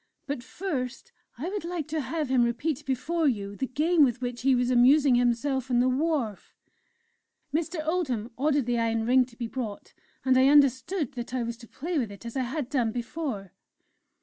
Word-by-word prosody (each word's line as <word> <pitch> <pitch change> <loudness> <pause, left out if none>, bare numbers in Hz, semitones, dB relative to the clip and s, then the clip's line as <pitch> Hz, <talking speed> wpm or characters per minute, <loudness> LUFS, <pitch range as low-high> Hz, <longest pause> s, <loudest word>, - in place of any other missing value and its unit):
But 285 -3 -3
first, 270 -4 -4 0.3
I 290 +8 -4
would 405 -1 -4
like 340 -3 -4
to 310 0 -1
have 305 0 -3
him 255 -2 +4
repeat 250 +5 -1
before 300 +5 0
you 205 -6 -1
the 265 - -2
game 310 +5 +3
with 250 -2 +2
which 245 -1 -4
he 265 0 +4
was 245 0 +1
amusing 265 +3 +5
himself 245 +2 +1
on 245 -1 +3
the 250 - +3
wharf." 260 - -1 1.0
Mr. 325 0 -1
Oldham 265 -10 -1
ordered 285 -1 +1
the 240 -1 0
Iron 225 -1 0
Ring 255 +2 +4
to 235 -2 -19
be 240 - -3
brought, 225 -3 -6 0.3
and 260 -1 +4
I 260 - +6
understood 285 +3 +3
that 245 -1 -6
I 250 - 0
was 235 0 -3
to 230 -1 -13
play 325 +6 -3
with 230 -6 -2
it 200 +3 -12
as 230 - -7
I 265 - +1
had 265 +1 -3
done 250 -5 0
before. 240 - -4
260 Hz, 195 wpm, -27 LUFS, 240-300 Hz, 1.0 s, I